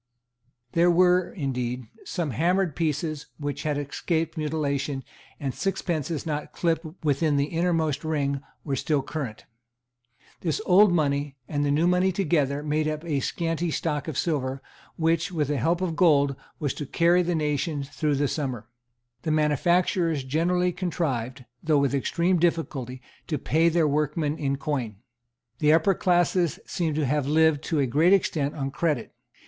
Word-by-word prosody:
There 170 +1 +4
were, 180 +1 +4
indeed, 125 - -3 0.2
some 170 -6 -2
hammered 175 - +1
pieces 155 -1 -2
which 145 -1 -4
had 150 -2 -1
escaped 160 +3 -2
mutilation; 145 -3 -2 0.4
and 135 -2 -3
sixpences 170 -5 -2
not 150 -2 -3
clipped 165 -1 0 0.2
within 145 +1 +2
the 140 - +2
innermost 165 -4 0
ring 140 -3 -1 0.2
were 140 -3 -2
still 145 +1 0
current. 135 -7 -5 0.9
This 160 -4 -1
old 195 +2 +6
money 145 -4 0
and 145 -1 -1
the 145 - +1
new 150 +4 +2
money 180 +1 +3
together 150 -6 0
made 150 +1 0
up 155 +1 -3
a 150 -4 0
scanty 165 +3 -1
stock 150 -2 -2
of 155 -4 -4
silver, 135 -5 -1 0.3
which, 165 +2 +1
with 150 -5 -1
the 145 - 0
help 170 +8 +1
of 175 -3 -1
gold, 145 -6 +4 0.2
was 145 -4 -1
to 145 - -6
carry 170 +4 +3
the 175 0 0
nation 150 -1 -1
through 145 +1 -1
the 145 +1 +1
summer. 130 -7 -3 0.5
The 160 - -3
manufacturers 160 +1 +2
generally 175 +6 +1
contrived, 135 -9 -3 0.2
though 155 -2 +2
with 140 -1 +2
extreme 170 +6 +1
difficulty, 135 -7 -1 0.2
to 155 - -1
pay 160 +4 +2
their 165 -1 +2
workmen 150 +1 0
in 140 -2 0
coin. 130 -7 -3 0.6
The 150 -1 +4
upper 165 +4 +4
classes 175 -2 +2
seem 160 -4 -2
to 155 -1 +1
have 140 +1 0
lived 160 -1 +3
to 160 - -1
a 140 - +3
great 155 +9 +4
extent 155 -6 +1
on 135 -2 -3
credit. 150 -6 -1
155 Hz, 155 wpm, -26 LUFS, 140-170 Hz, 0.9 s, old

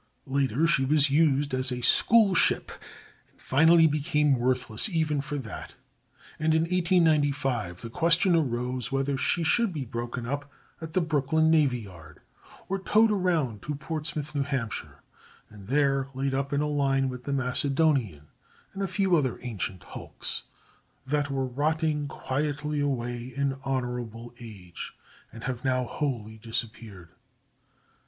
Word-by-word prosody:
Later 135 +1 +1
she 165 -5 +3
was 145 +1 +3
used 145 -2 +2
as 130 0 +1
a 125 0 -3
school 215 - +5
ship, - - +3 0.6
but - - -33
finally 160 +4 +5
became 150 -3 +2
worthless 125 - +1
even 155 -5 0
for 145 +1 -4
that, 125 -6 -8 0.6
and 155 +1 +2
in 160 - +3
1895 150 - +1
the 115 - -7
question 170 +4 +3
arose 125 -4 -1
whether 135 +1 0
she 170 +5 +1
should 230 +6 +2
be 150 -6 -4
broken 120 +1 -5
up 140 +2 -4 0.3
at 160 -1 -7
the 185 - +2
Brooklyn 160 0 +2
navy 140 -7 +3
yard 85 -7 -13 0.5
or 195 +1 -2
towed 215 +3 +3
around 165 - 0
to 150 - -4
Portsmouth, 150 0 -4
New 145 - 0
Hampshire, 135 -6 -4 0.5
and 100 -2 -13
there 135 0 +2
laid 135 0 -1
up 140 +1 -1
in 145 0 +1
a 150 - 0
line 135 -2 +1
with 125 -1 -6
the 140 - -3
Macedonian 130 - +1 0.5
and 195 - -5
a 195 - 0
few 190 -1 +2
other 135 -6 0
ancient 100 -6 -4
hulks - - -5 0.6
that 145 +1 0
were 135 -1 -1
rotting 150 +3 0
quietly 150 +2 -2
away 120 -3 -2
in 140 -1 0
honorable 125 -3 -4
age, 100 -7 -9 0.4
and 115 +1 -11
have 125 -2 -4
now 130 -1 +1
wholly 115 -6 -4
disappeared. 110 -5 -5
140 Hz, 145 wpm, -27 LUFS, 125-155 Hz, 0.6 s, school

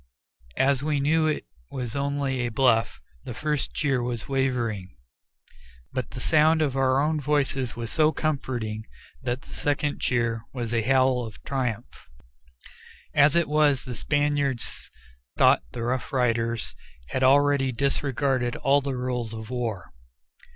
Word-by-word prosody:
As 135 -1 +3
we 150 0 0
knew 155 +3 +2
it 155 - -1 0.2
was 125 -4 -5
only 140 -1 -1
a 120 -1 0
bluff, 115 -2 +2 0.2
the 120 - -7
first 150 0 -2
cheer 135 -5 +1
was 120 -2 -3
wavering, 120 - -1 1.0
but 130 -3 -3
the 130 - -8
sound 155 +4 +4
of 140 -3 -1
our 135 0 +3
own 155 +2 +1
voices 135 -3 0
was 115 -1 -5
so 155 -1 +3
comforting 120 -9 -3 0.3
that 125 0 -3
the - - -14
second 145 0 -1
cheer 120 -2 0
was 120 -3 -3
a 115 - +2
howl 130 +1 +3
of 110 -2 -9
triumph. 125 - -4 1.0
As 145 +1 +5
it 170 -1 +3
was, 150 -3 +2
the 125 - -5
Spaniards 145 -2 -1 0.5
thought - - +5
the 115 - -5
Rough 125 +2 -2
Riders 115 -3 0 0.4
had 130 - -2
already 140 0 +4
disregarded 135 -1 0
all 140 +1 +3
the 135 -2 -3
rules 125 -3 -3
of 110 +1 -8
war. 115 -7 -4
130 Hz, 145 wpm, -26 LUFS, 120-145 Hz, 1.0 s, As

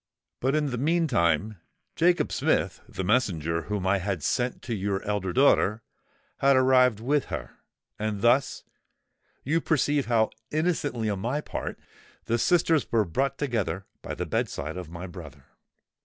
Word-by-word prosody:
But, 135 +3 +1
in 150 -2 0
the 125 - -3
meantime, 110 - +1 0.4
Jacob 175 +1 +2
Smith—the 95 - -1
messenger 85 - +1
whom 105 0 -3
I 95 +1 +2
had 95 -4 -3
sent 125 0 -1
to 120 - -3
your 100 -1 -2
elder 100 -3 -2
daughter—had 140 - +1
arrived 130 -3 +4
with 140 +5 +1
her; - - -7 0.4
and 105 -2 -2
thus—you 135 +4 -2
perceive 145 -3 +1
how 115 -2 +2 0.2
innocently 150 -8 -1
on 100 -2 -1
my 120 +8 -1
part,—the 120 -5 -6
sisters 165 0 +2
were 110 -2 +3
brought 135 +10 -1
together 105 - -2 0.2
by - - -5
the - - -3
bed - - -1
side 75 +3 -5
of 90 -3 -7
my 85 +2 -7
brother!" 80 -6 -10
115 Hz, 140 wpm, -27 LUFS, 95-140 Hz, 0.4 s, arrived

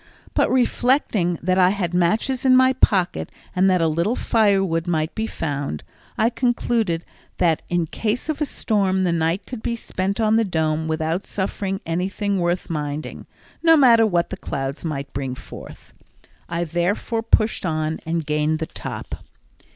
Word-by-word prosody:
But - - +2
reflecting 245 - +2
that 185 +2 +2
I 180 -1 +6
had 185 -3 -2
matches 215 +9 +1
in 260 -1 +5
my 260 0 +5
pocket, 180 - +1 0.2
and 185 +1 +4
that 180 -2 +3
a - - +3
little 170 +9 0
firewood 195 -9 +2
might 160 -1 0
be 220 0 -2
found, 140 - -4 0.3
I 225 +2 +3
concluded 235 -8 0 0.3
that 165 -3 +2
in 175 -1 +1
case 225 - -2
of 310 -1 -3
a 300 - +1
storm 195 -6 +1
the 180 - +2
night 165 +3 0
could 245 -4 -7
be 235 - -2
spent 195 -3 -3
on 220 0 +3
the 230 - +3
Dome 160 -4 -1
without 160 +3 -2
suffering 195 0 -3
anything 195 +4 -1
worth 175 +1 -1
minding, 150 -1 -4 0.3
no 325 -1 +6
matter 235 -5 +6
what 175 -4 0
the 190 - -4
clouds 135 -4 -4
might 140 -4 -4
bring 130 -1 -3
forth. - - -12 0.6
I 170 0 -1
therefore 175 +7 -1
pushed 225 -1 +1
on 155 -2 -1
and 165 -1 -2
gained 150 +1 +1
the 160 - -3
top. - - -7
180 Hz, 165 wpm, -22 LUFS, 160-220 Hz, 0.6 s, I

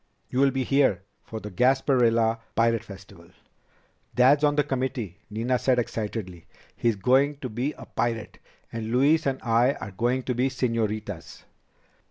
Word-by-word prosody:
"You'll 135 +2 +3
be 135 0 -1
here 130 -9 +2 0.2
for 110 - -7
the 105 -1 -8
Gasparilla 120 -1 +2 0.2
Pirate 115 -1 +2
Festival." 95 -4 -13 0.9
"Dad's 135 +4 +5
on 145 -1 +3
the 150 - +3
committee," 130 - -3
Nina 120 +4 -1
said 130 -2 +2
excitedly. 105 -7 -4 0.3
"He's 115 -2 +1
going 135 +7 +2
to 130 - -4
be 125 +7 -2
a - - -12
pirate. 115 -2 -3 0.3
And 115 -1 -4
Louise 140 +5 +3
and 135 -1 -1
I 120 +3 +3
are 100 - -8
going 120 +7 0
to 125 - -1
be 125 +2 +1
señoritas." 110 -7 -3
120 Hz, 150 wpm, -26 LUFS, 110-130 Hz, 0.9 s, Dad's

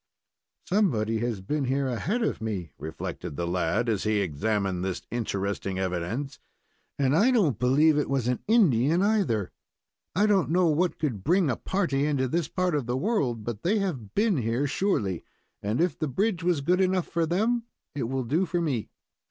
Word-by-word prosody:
"Somebody 120 - +1
has 115 -4 -2
been 140 +8 -1
here 135 +1 0
ahead 190 - -1
of 225 - -1
me," 100 -7 -3
reflected 80 -2 -6
the 85 - -2
lad, 90 +6 0
as 105 -4 0
he 110 0 +1
examined 100 +1 -1
this 95 -1 -3
interesting 100 -4 -2
evidence, 95 +9 -3 0.6
"and 140 0 +2
I 215 +10 +5
don't 180 - +2
believe 145 +5 +4
it 150 - -1
was 135 -3 0
an 125 -1 0
Indian, 170 - +4
either. 190 - +1 0.6
I 205 +4 +4
don't 200 -4 +3
know 180 +2 +3
what 170 +3 +1
could 120 -11 -2
bring 175 -1 +3
a - - 0
party 150 - 0
into 135 -3 +1
this 165 +4 -1
part 185 0 -1
of 145 -5 -1
the 125 +1 0
world, 130 - 0
but 115 -1 -5
they 205 +6 +2
have 155 - -3
been 210 -3 +2
here 120 +3 0
surely, 135 - 0 0.4
and 105 +5 -1
if 175 +1 +1
the 155 - 0
bridge 185 - 0
was 170 -4 +1
good 180 +6 +2
enough 185 -1 +2
for 165 -1 0
them, 225 +7 +1 0.3
it 135 -5 -3
will 135 0 -1
do 160 +10 0
for 175 +1 -1
me." 140 -10 -1
135 Hz, 185 wpm, -27 LUFS, 110-180 Hz, 0.6 s, I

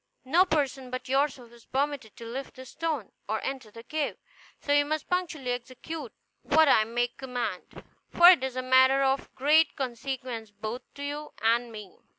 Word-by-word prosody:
No 335 +8 +4
person 275 -6 -1
but 255 0 -5
yourself 265 -3 0
is 235 -1 -18
permitted 275 -4 -2
to 230 - -9
lift 260 +4 -6
this 260 -1 -11
stone, 315 -9 -3 0.2
or 220 +1 0
enter 265 -5 -4
the 230 +2 -12
cave; 305 +3 -2 0.4
so 285 - 0
you 290 0 +5
must 310 +1 -3
punctually 335 -8 -1
execute 255 +6 -6 0.3
what 315 +1 +4
I 220 -5 +5
may 240 +2 0
command, 245 -7 -5 0.3
for 345 +1 +8
it 340 -8 +3
is 265 -1 -3
a 255 - -2
matter 260 +1 +5
of 270 0 0
great 305 +4 +4
consequence 250 -3 -4
both 215 +4 -6
to 285 - -7
you 295 +1 -5
and 235 +1 +2
me." 210 -4 -10
260 Hz, 175 wpm, -28 LUFS, 240-290 Hz, 0.4 s, for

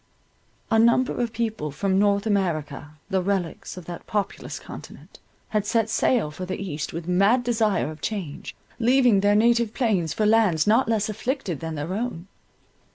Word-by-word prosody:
A 225 - +4
number 235 +3 +3
of 235 -2 -1
people 220 -8 -2
from 190 +6 0
North 200 0 +2
America, 155 -8 -2 0.2
the 190 -1 +2
relics 185 -2 -3
of 180 - -9
that 175 0 -8
populous 205 -2 -3
continent, - - -12 0.3
had 215 -2 0
set 225 +1 0
sail 225 -13 +1
for 170 +5 -7
the 185 +1 -4
East 160 -6 -4
with 165 +1 -6
mad 200 +8 +3
desire 220 -9 +1
of 155 -1 -12
change, 190 -4 -5 0.2
leaving 245 -3 +4
their 205 +1 +3
native 230 0 +3
plains 200 - +1
for 215 +7 0
lands 210 -8 +3
not 225 +3 +3
less 215 -2 +1
afflicted 215 - -3
than 160 -1 -5
their 150 +5 -4
own. 215 -5 -3
200 Hz, 165 wpm, -24 LUFS, 175-225 Hz, 0.3 s, A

